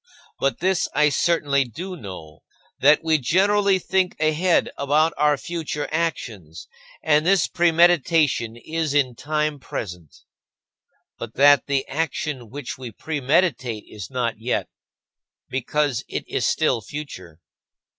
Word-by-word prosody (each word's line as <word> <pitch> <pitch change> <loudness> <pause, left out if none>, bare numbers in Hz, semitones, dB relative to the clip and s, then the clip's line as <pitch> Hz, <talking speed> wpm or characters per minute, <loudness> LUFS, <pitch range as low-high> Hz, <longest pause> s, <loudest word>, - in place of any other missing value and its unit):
But 135 +2 -1
this 185 0 +1
I 150 0 +4
certainly 145 -2 +1
do 175 - -7
know: 90 - -10 0.4
that 145 +4 +5
we 160 -1 +2
generally 195 +7 +3
think 185 0 -1
ahead 155 +3 +2
about 150 +3 +2
our 150 -1 +2
future 160 -3 -4
actions, 110 - -4 0.4
and 155 -1 +3
this 190 +1 +3
premeditation 165 -8 +2
is 155 +2 -3
in 135 -4 +2
time 150 +3 -2
present; 90 - -8 1.0
but 115 -1 -7
that 145 +1 +5
the 140 -1 0
action 145 -4 -3
which 135 0 -7
we 125 -3 -7
premeditate 135 - 0
is 100 -4 -9
not 120 -4 -2
yet, 120 +3 -2 0.8
because 135 0 -1
it - - -5
is - - -1
still 115 - +1
future. 95 - -9
145 Hz, 125 wpm, -23 LUFS, 125-165 Hz, 1.0 s, that